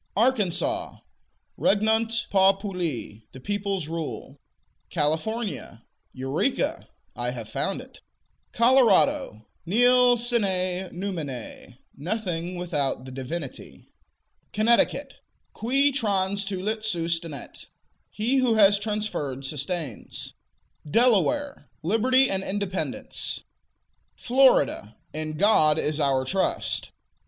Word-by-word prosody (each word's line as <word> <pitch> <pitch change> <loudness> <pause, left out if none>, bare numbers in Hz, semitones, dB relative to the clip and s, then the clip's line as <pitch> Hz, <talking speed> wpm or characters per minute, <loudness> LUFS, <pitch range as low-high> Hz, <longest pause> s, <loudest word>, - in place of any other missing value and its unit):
Arkansas 260 - +1 0.6
Regnant 220 +2 +2
populi: 190 - +1
The 130 - -10
peoples 200 0 -2
rule. 155 -4 -6 0.5
California 160 - -2 0.3
Eureka: 135 - -1 0.3
I - - -2
have - - -6
found - - -2
it. - - -15 0.5
Colorado 260 - +3 0.2
Nil 245 +6 +4
sine 190 -6 0
numine: 150 - -6 0.2
Nothing 180 0 -3
without 145 -7 -2
the 130 - -9
Divinity. 135 +3 -7 0.6
Connecticut 235 +6 +2 0.4
Qui 275 +5 +2
transtulit 200 -3 -1
sustinet: 165 - -3 0.4
He 240 +6 0
who 250 -4 +3
has 205 -1 +5
transferred, 205 - -3
sustains. 145 - -5 0.6
Delaware 255 - +2
Liberty 255 +8 +3
and 190 -3 -1
Independence. 195 -1 -2 0.7
Florida 245 - +3 0.2
In 155 0 -3
God 155 -6 +4
is 155 0 0
Our 135 -3 +2
trust. 190 +8 -1
195 Hz, 85 wpm, -25 LUFS, 155-230 Hz, 0.7 s, has